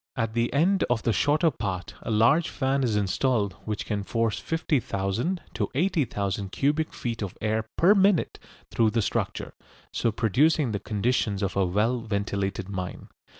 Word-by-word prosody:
At 115 -2 -1
the 120 0 0
end 180 +7 +3
of 120 -2 +1
the 115 - +2
shorter 150 - +3
part 95 -8 -4
a - - -6
large 115 +10 +4
fan 135 0 0
is 115 -4 +1
installed 105 +1 +1
which 105 -1 -3
can 105 -2 -2
force 115 0 -1
50,000 145 - -1
to - - -1
80,000 105 - 0
cubic 150 +5 0
feet 115 -2 -4
of 100 -4 -5
air 110 +1 -1
per 185 +5 +6
minute 195 -3 +2 0.3
through 115 -1 +3
the 115 0 0
structure, - - -2 0.4
so 115 - +1
producing 125 - +2
the 100 - -2
conditions 105 -1 0
of 95 - -2
a 95 -2 +2
well 110 +7 +1
ventilated 100 -3 -2
mine. 95 -3 -6
115 Hz, 160 wpm, -26 LUFS, 100-140 Hz, 0.4 s, per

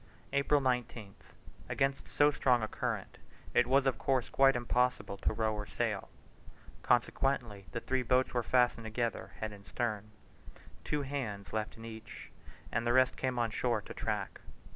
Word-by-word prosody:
April 140 +1 +3
19th. 125 -6 -2 0.5
Against 135 0 0
so 145 0 +4
strong 125 -4 +2
a - - 0
current - - -4 0.3
it 125 - +4
was, 135 +2 +4
of 135 - +1
course, 130 -3 +1
quite 135 -1 +5
impossible 125 -3 +1
to - - 0
row 110 0 0
or 105 -1 -4
sail: - - -2 0.7
consequently 120 -4 +1
the 115 - -3
three 130 0 0
boats 125 +1 +2
were 120 - +2
fastened 120 -1 +2
together 115 +1 -2
head 110 -1 -3
and 100 -1 -12
stern, 110 -3 -2 0.7
two 150 -1 -1
hands 120 -9 -4
left 110 0 -2
in 115 - -9
each, 110 0 -9 0.4
and 115 +1 0
the 120 - +3
rest 130 0 +4
came 130 -1 -2
on 115 -2 +1
shore - - +1
to - - -8
track. - - -3
120 Hz, 165 wpm, -33 LUFS, 110-130 Hz, 0.7 s, quite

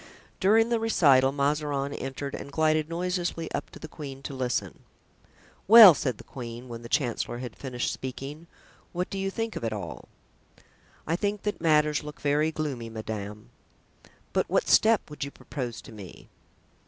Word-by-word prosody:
During 220 +4 +4
the 235 -1 +1
recital 140 -12 +4
Mazarin 140 0 -1
entered 135 +1 -5
and 140 - -7
glided 155 +1 +1
noiselessly 175 -1 -2
up - - -3
to - - -12
the - - -8
queen 140 -3 -9
to 140 - -6
listen. 130 -2 -2 0.9
"Well," 215 -3 +11
said 130 -5 -2
the - - -12
queen, 120 -1 -8
when 115 -1 -7
the 115 - -10
chancellor 120 -4 -1
had 120 -2 -7
finished 125 -3 -3
speaking; 140 +5 -7 0.5
"what 180 +1 -3
do 195 - -3
you 195 0 -1
think 225 +2 -3
of - - -5
it 115 - -1
all?" 105 -2 -7 1.0
"I 165 - 0
think 205 +2 -2
that 210 -4 -3
matters 150 -2 +3
look 150 0 -9
very 150 +2 +1
gloomy, 140 -7 -4
madame." 105 -1 -6 0.8
"But - - 0
what - - +1
step 220 -1 +4
would 150 -1 -6
you 140 - -4
propose 125 -4 -6
to - - -12
me?" 100 -5 -12
145 Hz, 165 wpm, -27 LUFS, 125-170 Hz, 1.0 s, Well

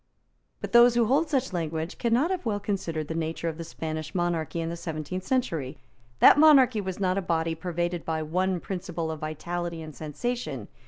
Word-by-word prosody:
But - - -5
those 240 0 +7
who 235 -1 +4
hold 290 +7 +2
such 265 -7 0
language 165 0 -3
cannot 245 +9 +2
have 370 - -2
well 215 -4 -1
considered 165 -7 -3
the 160 - -3
nature 165 +1 -3
of 160 0 -4
the - - -3
Spanish 155 -1 -5
monarchy 170 -2 -1
in 165 0 -2
the 170 - -4
seventeenth 165 +2 -5
century. 165 - -1 0.4
That - - +8
monarchy 265 -8 +6
was 190 -1 -5
not 185 0 +1
a - - -2
body 165 -2 0
pervaded 175 +1 -3
by 160 -1 -2
one 185 +3 0
principle 170 -3 -4
of 160 - -6
vitality 170 +2 -4
and 155 -2 -10
sensation. 235 - -4
175 Hz, 190 wpm, -27 LUFS, 160-210 Hz, 0.4 s, That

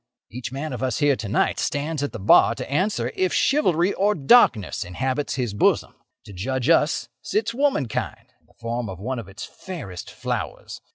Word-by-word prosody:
Each 120 +1 -6
man 140 +2 -4
of 125 - -5
us 130 -3 -1
here 145 -2 +3
to 110 -5 -6
night 110 - +1
stands 150 +1 -2
at 145 - -2
the - - -6
bar 105 +4 +5
to - - -6
answer 145 - 0
if 185 -1 +1
chivalry 185 - +2
or 205 +2 +1
darkness 135 - +4
inhabits 130 +10 -2
his 125 -6 -2
bosom. 105 - +2 0.3
To 100 - -11
judge 130 - -2
us 155 -6 +3
sits 220 +2 -1
womankind 245 - -1
in - - -36
the - - -26
form 115 -1 -3
of 95 -2 -7
one 125 +5 -3
of 110 - -8
its 95 +4 -8
fairest 140 - -8
flowers. - - -5
130 Hz, 185 wpm, -23 LUFS, 115-170 Hz, 0.3 s, bar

